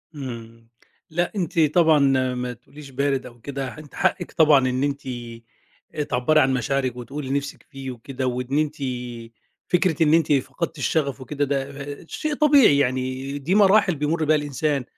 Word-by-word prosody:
امم، 115 -4 -8 0.4
لأ 175 +2 -1
أنتِ 175 -3 -1
طبعًا 160 0 +4 0.4
ما 125 0 -3
تقوليش 135 +4 -14
بارد 135 0 -1
أو 120 -1 -12
كده، 135 0 -5
أنتِ 150 -2 -12
حقِك - - 0
طبعًا 145 -5 +4
إن 130 +2 -1
أنتِ، 140 0 -1 0.9
آآ 150 - 0
تعبري 135 +4 +2
عن 135 -2 +3
مشاعرِك، 130 0 -1
وتقولي 135 +3 -6
اللي 140 +1 +1
نِفْسِك 140 0 -9
فيه 135 -3 -7
وكده، 130 +2 -5
وإن 125 +2 -2
أنتِ، 150 0 0 0.9
فكرة 175 -2 +2
إن 155 0 +3
أنتِ 165 -2 +3
فقدتِ 160 +4 -2
الشغف 140 -2 -1
وكده، 145 +2 -2
ده 140 0 0 0.4
آآ - - -16
شيء 305 - -3
طبيعي، 280 - +5
يعني 130 +1 -1
دي 155 +8 -1
مراحل 200 -3 +5
بيمر 155 +3 -1
بيها 155 +1 +4
الإنسان، 145 -1 -1
140 Hz, 165 wpm, -23 LUFS, 130-155 Hz, 0.9 s, طبيعي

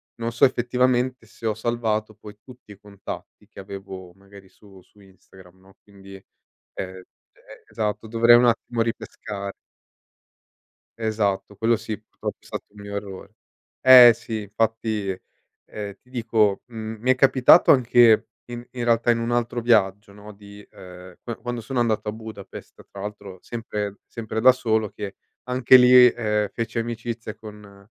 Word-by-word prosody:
non 115 0 -4
so 120 +4 +4
effettivamente 125 -1 0
se 115 - -13
ho 110 - +1
salvato 110 -1 -2
poi 105 0 -14
tutti 125 -4 -16
i 100 - -14
contatti 100 -1 -10
che - - -15
avevo 95 -2 -10
magari 100 0 -17
su 95 -2 -19
-su 105 - -27
Instagram, 95 -1 -19
no, 95 +1 -22
quindi, 100 -1 -15 0.4
ehm, 95 0 -9 0.3
e - - -17
esatto 105 0 -3
dovrei 115 +1 +5
un 125 - +3
attimo 120 0 0
ripescare. 105 -3 -5 1.5
Esatto, 105 -3 -2
quello 115 +3 +2
sì, 110 -1 -6
purtroppo 110 - -8
è - - -27
stato - - -6
un 105 0 -15
mio 100 0 -8
errore. 100 -2 -8 0.5
Eh, 125 -2 +9
sì 110 -2 -6
infatti, 110 0 -2 0.6
ehm, 105 -1 -7
ti 125 - -28
dico, 110 -5 0
mhmm, 110 -2 -8
mi 130 +2 +2
è - - +3
capitato 135 +4 +5
anche 120 -3 +4 0.2
in 120 0 -8
in 125 -1 -5
realtà 120 0 +2
in 115 - 0
un 115 +1 -3
altro 120 0 -1
viaggio, 105 -3 +1
no, 105 +1 -12
di 100 0 -15
ehm, 90 -1 -13
q 115 -2 -8
quando 120 0 -4
sono 120 +2 -2
andato 110 -2 -1
a - - -1
Budapest, 110 -3 -11
tra 100 - -10
l'altro 100 -2 -8
sempre 105 -3 -5
sempre 110 -1 -5
da 130 +3 +6
solo, 110 -4 -1
che 100 -1 -8 0.3
anche 125 0 +5
lì, 125 -1 +7 0.2
ehm, 105 -3 -1
feci 115 0 -3
amicizia 115 -1 -5
con, 105 -2 -14
110 Hz, 160 wpm, -23 LUFS, 100-120 Hz, 1.5 s, Eh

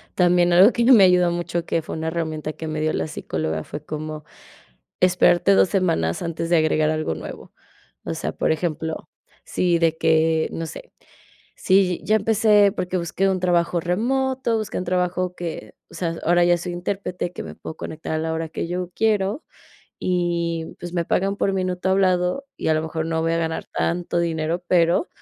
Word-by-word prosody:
También 175 -1 +3
algo 190 +6 +7
que 235 - +1
me 220 -6 +8
ayudó 180 -1 +5
mucho, 170 0 -3
que 165 - 0
fue - - -6
una 160 0 -3
herramienta 160 -2 -3
que 160 - -7
me 155 0 -3
dio 155 0 0
la - - -1
psicóloga, 80 - -3
fue 150 - -8
como 155 0 -6 0.8
esperarte 180 +1 +4
2, 190 - +4
semanas 165 - 0
antes 165 0 -4
de 175 - +5
agregar 155 -1 +2
algo 155 - -1
nuevo. 80 - -9 0.5
O - - -3
sea, - - -3
por - - 0
ejemplo, 160 -1 -3 0.3
si 175 -2 0
de 165 -1 +2
que, 160 0 +2
no 165 - -4
sé, - - -10 0.6
si 185 -2 +2
yi - - -18
ya 215 - +3
empecé 210 -1 +4
porque 185 -2 -3
busqué 180 +2 0
un 190 -1 +1
trabajo 175 -1 +1
remoto, 240 +7 0
busqué 215 -1 -3
un 180 - -3
trabajo 180 0 -1
que, 170 -2 -6 0.2
o - - -15
sea, 165 -2 -3
ahora 175 +1 +4
ya 175 0 +4
soy 175 +1 -5
intérprete 180 0 -4
que - - -7
me - - -8
puedo 160 - -9
conectar 160 0 -5
a - - 0
la 160 0 -2
hora 160 0 -3
que 165 - -4
yo 180 +1 -4
quiero, 215 +3 +1 0.6
y 170 -2 -1
pues, 175 0 -7
me 170 -1 -1
pagan 195 +4 0
por 195 - 0
minuto 185 -1 -2
hablado 185 +5 +1
y - - -2
a - - +4
lo 155 - +1
mejor 160 0 -3
no 165 0 -1
voy 165 0 0
a - - +1
ganar 160 -1 -2
tanto 175 0 -1
dinero, 165 0 -1
pero, 170 - +3
175 Hz, 195 wpm, -22 LUFS, 160-185 Hz, 0.8 s, me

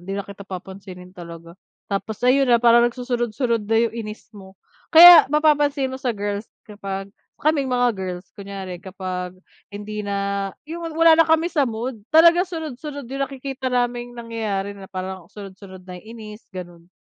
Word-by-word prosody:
hindi 195 +3 -6
na 200 - -4
kita 200 0 -12
papansinin 185 -1 -9
talaga. 170 -2 -11 0.3
Tapos 200 +1 -4
ayun 265 +1 +4
na 240 - +6
parang 235 0 +5
nagsunod-sunod 240 -2 -2
na 225 - +2
yung 230 -1 +2
inis 215 -2 -7
mo. 190 -2 -14 0.3
Kaya 345 -2 +10
mapapansin 290 -3 +2
mo 260 - -7
sa 245 -4 -2
girls 205 +1 -4 0.2
kapag 195 -1 -7 0.2
kaming 295 -3 0
mga 245 -1 +2
girls 185 -2 -6
kunyari 195 -3 -8
kapag 185 -1 -6 0.3
hindi 210 +1 -7
na 200 -1 -2 0.2
yung 330 +2 -6
wala 330 0 +6
na 325 - +3
kami 325 +2 +2
sa 285 -5 +2
mood 230 +1 -5
talaga 340 +3 +5
sunod-sunod 300 -4 -6
yung 275 0 -2
nakikita 270 0 -5
naming 245 -1 -2
nangyayari 215 -4 -4
na 195 -1 -12
parang 185 -1 -7
sunod-sunod 190 -2 -12
na 180 -1 -9
inis 220 0 -11
gano'n. 175 -2 -10
220 Hz, 160 wpm, -22 LUFS, 195-260 Hz, 0.3 s, Kaya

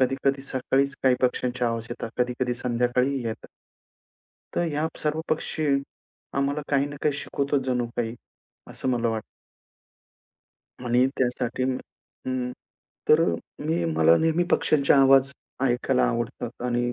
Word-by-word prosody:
कधी-कधी 135 +1 +1
सकाळीच 135 +1 0
काही 130 -1 +5
पक्ष्यांच्या 125 -1 +1
आवाज 115 0 -3
येतात. 115 -1 -5
कधी-कधी 125 0 0
संध्याकाळीही 125 +2 0
येतात. 110 - -5 1.1
तर - - +1
ह्या 150 +2 0
सर्व 155 +1 0
पक्षी, 155 0 -1 0.7
आम्हाला 140 +2 0
काही 140 -1 +2
ना 145 0 -7
काही 150 - +3
शिकवतो 140 +1 -1
जणू 125 -2 0
काही. 115 -1 -1 0.6
असं - - -3
मला 120 -2 +1
वाटतं. 110 -1 -2 1.6
आणि 125 +2 +4
त्यासाठी 125 0 0
अं, 130 0 +1 0.5
उम्म 130 -1 -1 0.6
तर 155 +1 +7 0.5
मी 85 +1 +1
मला 80 +1 +6
नेहमी 165 +2 +2
पक्ष्यांचे 140 -2 +3
आवाज 135 0 +6 0.4
ऐकायला 125 +1 +1
आवडतात 120 +1 -4
आणि 120 0 0
130 Hz, 130 wpm, -25 LUFS, 120-140 Hz, 1.6 s, तर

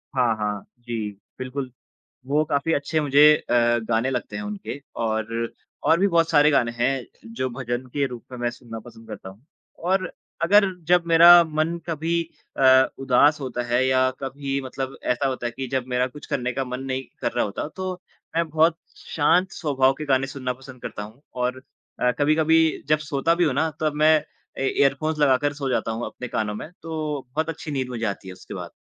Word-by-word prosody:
हाँ, 120 -3 +3
हाँ। 105 -2 -2 0.2
जी, 115 -3 -4 0.3
बिल्कुल, 130 +1 -4 0.6
वो 150 +3 +2
काफ़ी 150 +2 0
अच्छे 150 +2 0
मुझे 145 0 +4
अ, 120 - -4 0.4
गाने 115 +3 +2
लगते 125 -2 -3
हैं 210 - -4
उनके, 205 -7 -5 0.2
और 115 +1 -2 0.4
और 165 - +5
भी 200 - +4
बहुत 165 -3 +2
सारे 150 +1 +5
गाने 120 -4 +2
हैं, 125 +1 0 0.3
जो 130 +2 -2
भजन 120 0 -4
के 140 -1 +1
रूप 125 -2 -9
में 125 - -7
मैं 120 0 0
सुनना 115 -2 -9
पसंद 115 0 -14
करता 95 - -8
हूँ। 100 +3 -15 0.4
और 185 0 +1 0.3
अगर 205 +4 +6 0.2
जब 175 -1 +4
मेरा 170 +1 +9
मन 160 +2 -1
कभी 165 +1 0 0.4
अ, 130 0 +6
उदास 140 +3 +4
होता 125 -2 -3
है 120 +2 +2
या 130 0 +3
कभी 135 +1 -3
मतलब 130 +1 -5
ऐसा 125 +3 +1
होता 130 -2 -3
है 120 - -1
कि 130 +1 -5
जब 130 -2 0
मेरा 125 0 +1
कुछ 145 +3 -12
करने 125 -1 -2
का 135 - -1
मन 125 +1 -5
नहीं 130 0 -2 0.2
कर - - 0
रहा 120 - 0
होता, 105 +8 -4
तो 185 +3 -4 0.4
मैं 165 0 +1
बहुत 160 +2 +3 0.2
शांत 175 +5 +1
स्वभाव 135 -4 +2
के 155 +2 -7
गाने 135 -1 +2
सुनना 130 -2 -3
पसंद 130 -1 -13
करता 105 - -5
हूँ। 110 +6 -13
और 125 +1 -2 0.4
अ, 125 - +3
कभी-कभी 160 +2 +3
जब 155 0 +3
सोता 150 +4 +2
भी 175 - +2
हूँ 145 - +1
ना, 160 +4 +1
तब 155 -1 +1
मैं 155 +1 +5 0.4
ए 135 - +1
ईयरफोन्स 150 +3 +2
लगाकर 145 0 +3
सो 140 -2 -3
जाता 120 -2 0
हूँ 115 +2 -3
अपने 125 - -7
कानों 105 -2 -2
में, 150 - -7
तो 155 -3 -3
बहुत 160 +1 0
अच्छी 155 -1 -6
नींद 130 -2 -2
मुझे 115 -2 -3
आती 100 -1 -4
है 95 - -7
उसके - - -11
बाद। - - -7
135 Hz, 200 wpm, -24 LUFS, 125-155 Hz, 0.6 s, मेरा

